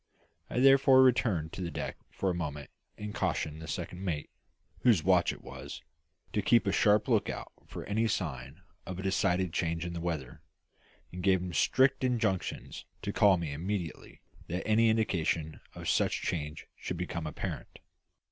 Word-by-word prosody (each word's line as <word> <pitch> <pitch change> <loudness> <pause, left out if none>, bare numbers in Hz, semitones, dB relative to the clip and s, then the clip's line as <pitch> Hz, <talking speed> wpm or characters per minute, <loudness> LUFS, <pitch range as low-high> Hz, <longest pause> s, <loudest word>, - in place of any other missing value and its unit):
I - - -1
therefore 135 0 +7
returned 105 -11 +2
to - - -5
the 85 - -2
deck 75 - -4
for 95 - -1
a - - -1
moment 75 -4 -5 0.3
and 105 0 -6
cautioned 80 0 -2
the 80 - -8
second 90 +2 -5
mate 80 -6 -3 0.5
whose 110 -11 +4
watch 90 -2 +4
it - - -11
was 70 +4 -8 0.5
to - - +1
keep 115 -2 +4
a 100 - +2
sharp 105 +1 +3
lookout - - 0 0.2
for - - -7
any 110 +3 +1
sign 75 - -4 0.2
of 95 -2 -5
a 95 - -5
decided 95 -2 +1
change 85 -1 -1
in 85 - -4
the 85 - -4
weather; 80 -7 -4 0.7
and 90 - -6
gave 95 0 +4
him 90 -1 -5
strict 130 +7 +3
injunctions 115 -7 -1 0.2
to - - -2
call 100 -3 +5
me 80 -4 -3
immediately 90 +1 -4 0.3
that 90 +3 -3
any 110 +1 +4
indication 85 -8 0
of - - -7
such - - +1
change 75 -3 -3
should 90 - -5
become 85 -2 -3
apparent. 75 - -5
90 Hz, 165 wpm, -31 LUFS, 80-105 Hz, 0.7 s, therefore